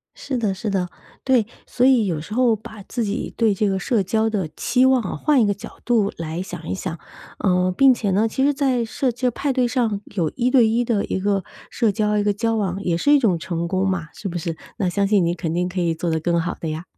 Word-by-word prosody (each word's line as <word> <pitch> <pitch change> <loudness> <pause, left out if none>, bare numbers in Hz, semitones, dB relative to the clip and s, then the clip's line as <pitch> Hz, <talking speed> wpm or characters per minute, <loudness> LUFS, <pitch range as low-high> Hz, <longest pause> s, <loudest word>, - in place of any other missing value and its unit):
是 270 -3 -4
的 215 -4 0
是 205 +2 -4
的。 185 -2 -1 0.4
对， 250 -5 +3 0.2
所 250 - 0
以 250 -5 +5
有 165 -5 -1
时 185 +7 -10
候 240 -2 +3
把 215 -1 -11
自 235 -3 -3
己 205 - -3
对 220 -3 +3
这 205 +1 +1
个 190 - 0
社 210 +3 +1
交 220 +4 0
的 190 -7 -1
期 255 +1 +2
望 260 -2 +4
啊， 195 - -4
换 280 - +2
一 - - +3
个 205 - +2
角 200 - -10
度 220 -5 +2
来 165 +1 -4
想 175 -3 -8
一 - - -1
想。 175 -3 -5 0.4
呃， 180 -1 +2
并 270 -1 +7
且 210 -5 -1
呢， 210 +4 +3
其 245 +4 -1
实 290 0 +3
在 265 -3 +1
设 250 +2 -1
置 250 +1 0
派 275 +4 -2
对 250 -2 +1
上 230 -5 0
有 170 -6 0
一 250 0 +1
对 250 -3 +5
一 235 +2 +1
的 220 -4 0
一 190 - -2
个 200 -2 0 0.3
社 225 -4 +1
交、 210 0 0
一 205 - +2
个 205 - +2
交 225 +2 -1
往， 195 -2 -2
也 170 -3 0
是 290 +11 +3
一 290 - +7
种 200 -10 +2
成 170 -1 -3
功 190 +1 0
嘛， 170 -5 -2
是 - - -8
不 175 -1 -3
是？ 165 -1 -4 0.2
那 190 - +1
相 200 +3 +1
信 200 -3 +3
你 170 +1 +1
肯 165 -2 -3
定 180 +2 0
可 180 0 -3
以 165 -1 +1
做 170 +2 -3
得 160 - +1
更 170 +1 +1
好 170 - -2
的 160 - -4
呀。 155 +3 -4
205 Hz, 285 characters per minute, -22 LUFS, 180-235 Hz, 0.4 s, 并